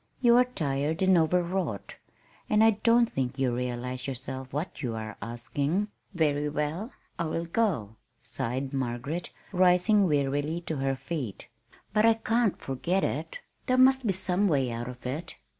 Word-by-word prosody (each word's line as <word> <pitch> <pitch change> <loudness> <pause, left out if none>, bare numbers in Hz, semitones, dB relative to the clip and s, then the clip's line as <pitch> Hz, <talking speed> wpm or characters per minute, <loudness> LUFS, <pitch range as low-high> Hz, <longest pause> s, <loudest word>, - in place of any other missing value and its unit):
You 240 -2 +5
are 250 - +6
tired 155 - -1
and 190 0 +5
overwrought, 170 - 0 0.5
and 215 +1 +4
I 225 - +7
don't 230 +3 +4
think 130 - -3
you 130 -3 +1
realize 125 +1 -3
yourself 130 0 -6
what 150 +3 -4
you 120 -5 -2
are 110 -1 -5
asking." 140 - -2 0.3
"Very 150 -3 +1
well, 150 - -2 0.3
I 170 - 0
will 165 +1 -2
go," 165 - -1 0.2
sighed 130 +4 -3
Margaret, 135 +6 -3 0.2
rising 185 +2 +4
wearily 145 +2 0
to 160 -3 -4
her 135 0 0
feet. 130 - -5 0.4
"But 215 +1 +5
I 225 - +5
can't 225 -1 +1
forget 175 +8 -1
it. - - -2 0.3
There 255 -1 +3
must 260 -1 +5
be 195 - +2
some 190 +2 +1
way 135 -7 +1
out 120 +1 -4
of 125 0 -11
it. 150 +7 -4
155 Hz, 160 wpm, -28 LUFS, 130-195 Hz, 0.5 s, I